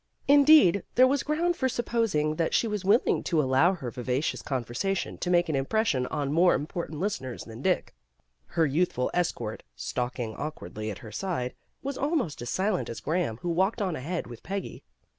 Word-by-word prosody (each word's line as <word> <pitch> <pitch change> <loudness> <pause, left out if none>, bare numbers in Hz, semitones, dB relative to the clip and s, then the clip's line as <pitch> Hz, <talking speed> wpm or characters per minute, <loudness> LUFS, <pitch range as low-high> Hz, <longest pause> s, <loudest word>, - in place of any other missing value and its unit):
Indeed, 285 - +7
there 255 - +7
was 275 +2 +2
ground 340 +3 0
for 260 -5 0
supposing 225 -11 0
that 165 - +1
she 230 - +2
was 210 -3 -3
willing 205 +6 +3
to 165 - +1
allow 150 +7 +3
her 130 -8 -6
vivacious 125 +4 -2
conversa 130 - -2
tion - - -5
to 180 - -2
make 175 -1 +3
an 155 - -1
impression 135 - +1
on 140 -1 -2
more 175 +3 +5
important 155 0 -4
listeners 130 - -3
than 115 +2 -10
Dick. 180 +3 0 0.5
Her 165 -2 +1
youthful 145 -3 0
escort, 180 -1 -1
stalking 120 - -3
awkwardly 110 -8 -5
at 100 - -5
her 110 - -9
side, 130 - -3 0.3
was 275 0 -4
almost 280 - -1
as 120 - -5
silent 190 0 0
as 115 - -5
Graham 155 -8 -1
who 175 - -1
walked 190 +7 +1
on 190 -5 -1
ahead 165 +7 -3
with 120 -1 -10
Peggy. 195 -1 -5
170 Hz, 180 wpm, -28 LUFS, 130-205 Hz, 0.5 s, Indeed